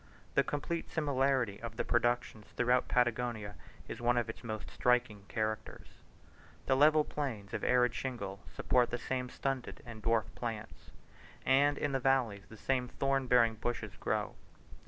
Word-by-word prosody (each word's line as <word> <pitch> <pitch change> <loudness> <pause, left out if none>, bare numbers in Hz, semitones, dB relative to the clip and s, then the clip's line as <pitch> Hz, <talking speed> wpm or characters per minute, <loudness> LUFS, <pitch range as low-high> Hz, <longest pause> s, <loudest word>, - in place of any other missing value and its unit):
The - - +4
complete 160 +3 -3
similarity 135 -7 +1
of 115 -1 -6
the - - -1
productions 120 -3 0
throughout 125 +1 +3
Patagonia 120 -4 0 0.3
is - - -6
one 120 +1 +3
of 120 -1 0
its - - -17
most 110 -2 -5
striking 120 -5 +1
characters. 110 -1 -3 0.8
The 135 - +3
level 150 +2 +6
plains 115 -10 -4
of - - -3
arid 125 -2 +3
shingle 100 -8 -4
support 125 -1 +2
the 120 - -2
same 125 0 -3
stunted 135 -1 -3
and 115 -3 -9
dwarf 115 -2 +2
plants; 110 -2 -6 0.6
and 140 +2 +4
in 145 - -1
the 135 - +1
valleys 125 -7 +1
the 110 - -11
same 125 +2 0
thorn 135 +1 0
bearing 120 -2 +5
bushes 120 +2 -4
grow. - - -1
120 Hz, 155 wpm, -33 LUFS, 110-135 Hz, 0.8 s, level